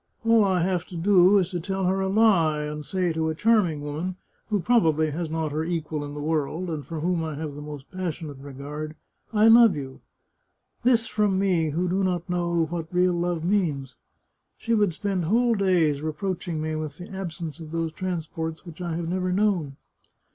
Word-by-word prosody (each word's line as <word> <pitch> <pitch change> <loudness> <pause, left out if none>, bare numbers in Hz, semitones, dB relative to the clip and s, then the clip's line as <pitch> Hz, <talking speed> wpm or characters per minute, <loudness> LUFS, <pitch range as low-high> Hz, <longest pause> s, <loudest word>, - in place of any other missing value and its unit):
All 230 -1 +5
I 190 -3 +2
have 180 -1 0
to 175 - -8
do 190 +2 +5
is 185 -1 +1
to 175 - -2
tell 190 +2 -2
her 190 +1 +1
a 190 - 0
lie, 190 -8 +3
and 150 0 -5
say 180 +1 -1
to 160 0 0
a 160 - -2
charming 185 -7 +2
woman, 155 +5 -4 0.3
who 210 -2 +1
probably 160 -8 +3
has 165 +2 -3
not 160 -1 -2
her 155 +2 -1
equal 160 -3 -3
in 145 0 -7
the - - -5
world, 160 +3 -1
and 150 -3 -4
for 155 +3 -6
whom 175 0 0
I 155 -2 -4
have 150 0 -5
the 145 - -8
most 150 -2 -9
passionate 165 -6 -5
regard, 145 +3 -7 0.2
* - - -41
I 220 - +7
love 225 -4 +7
you.' 135 -2 -7 0.8
This 235 -2 +4
from 210 -4 +1
me, 180 -5 +2
who 170 +5 -1
do 190 +2 0
not 180 -2 -1
know 170 -2 0
what 165 0 -5
real 180 0 +3
love 175 -1 -1
means! 165 -9 0 0.6
She 230 - -1
would 205 -4 +3
spend 190 +1 -2
whole 235 +6 +3
days 175 -8 +2
reproaching 165 +1 -3
me 155 0 -2
with 155 -1 -4
the 180 +2 -10
absence 170 -4 -5
of 160 -2 -8
those 165 0 -2
transports 165 -2 -4
which 170 0 -10
I 170 -2 -2
have 170 0 -3
never 185 +1 -1
known. 180 -8 +1
170 Hz, 200 wpm, -25 LUFS, 155-190 Hz, 0.8 s, I